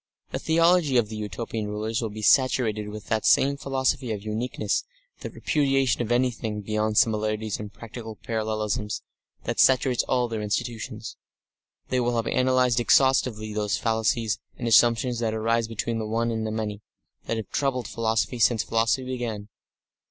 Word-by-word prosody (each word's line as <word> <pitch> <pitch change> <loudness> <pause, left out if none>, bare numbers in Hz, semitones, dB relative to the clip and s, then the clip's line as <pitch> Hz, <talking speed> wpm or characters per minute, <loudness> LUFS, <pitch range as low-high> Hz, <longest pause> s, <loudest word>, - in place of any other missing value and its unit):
The - - -2
theology 165 -4 +3
of 110 -3 +2
the 110 - -6
Utopian 105 +1 -4
rulers 110 +2 -2
will 115 - -2
be 110 +1 -8
saturated 110 -2 +3
with 105 -1 -8
that 110 -1 0
same 140 +1 +4
philosophy 135 -2 -1
of 105 -2 -4
uniqueness, 110 -1 -2 0.4
that - - -8
repudiation 135 -5 +1
of 120 -1 -3
anything 120 -4 0
beyond 110 +1 -1
similarities 110 -1 +1
and 105 -1 -7
practical 115 0 -9
parallelisms, 110 -4 -2 0.4
that - - -3
saturates 130 -1 +4
all 125 -1 +1
their 110 -2 -4
institutions. 110 +2 -4 0.7
They 130 - +1
will 120 0 0
have 115 0 0
analysed 130 -1 +2
exhaustively 120 -4 +3
those 105 -1 0
fallacies 110 0 0 0.2
and 120 - -3
assumptions 120 +1 +4
that 110 -2 -1
arise 115 +1 +1
between 115 +1 -3
the 110 - -3
One 115 +2 0
and 110 -1 -2
the - - -3
Many, 105 -1 -3 0.5
that 115 - -1
have 110 -3 -6
troubled 135 -3 -1
philosophy 115 +2 -1
since 115 -1 +3
philosophy 115 +3 +1
began. 115 -5 -4
115 Hz, 160 wpm, -25 LUFS, 110-125 Hz, 0.7 s, same